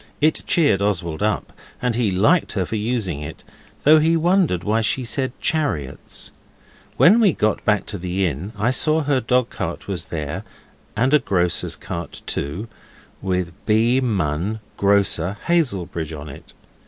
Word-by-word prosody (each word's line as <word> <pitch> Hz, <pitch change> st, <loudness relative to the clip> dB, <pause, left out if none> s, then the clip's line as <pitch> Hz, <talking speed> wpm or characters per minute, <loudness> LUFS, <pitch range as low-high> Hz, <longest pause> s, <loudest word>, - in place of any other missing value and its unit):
It 155 Hz, +1 st, +2 dB
cheered 145 Hz, -, +3 dB
Oswald 85 Hz, -5 st, -1 dB
up, 105 Hz, +1 st, -1 dB, 0.3 s
and 125 Hz, -1 st, 0 dB
he 115 Hz, -2 st, +1 dB
liked 110 Hz, -, +2 dB
her 95 Hz, -3 st, 0 dB
for 110 Hz, -, -4 dB
using 105 Hz, -, -2 dB
it, 75 Hz, +2 st, -8 dB, 0.4 s
though 155 Hz, +2 st, +7 dB
he 165 Hz, +2 st, +3 dB
wondered 170 Hz, -, +2 dB
why 110 Hz, +3 st, +1 dB
she 120 Hz, +4 st, 0 dB
said 130 Hz, +2 st, 0 dB
chariots. 80 Hz, -, -2 dB, 0.7 s
When 205 Hz, +7 st, +7 dB
we 205 Hz, -7 st, +4 dB
got 110 Hz, -3 st, 0 dB
back 105 Hz, -2 st, +2 dB
to 100 Hz, -, -6 dB
the 90 Hz, +2 st, -1 dB
inn 85 Hz, +5 st, -3 dB
I 110 Hz, +4 st, +2 dB
saw 155 Hz, +4 st, +2 dB
her 140 Hz, -2 st, +1 dB
dogcart 125 Hz, +1 st, -1 dB
was 90 Hz, -5 st, -4 dB
there, 75 Hz, -3 st, -4 dB, 0.5 s
and 130 Hz, +6 st, +2 dB
a 150 Hz, -, +7 dB
grocer's 90 Hz, -, 0 dB
cart -, -, -7 dB
too, 80 Hz, +11 st, -3 dB, 0.5 s
with 90 Hz, -3 st, -1 dB
B. 115 Hz, +4 st, +3 dB
Munn, 100 Hz, -, -1 dB, 0.2 s
grocer, 100 Hz, -2 st, +2 dB
Hazelbridge, 95 Hz, -, 0 dB
on 75 Hz, +1 st, -8 dB
it. 70 Hz, -, -12 dB
105 Hz, 155 wpm, -21 LUFS, 90-130 Hz, 0.7 s, though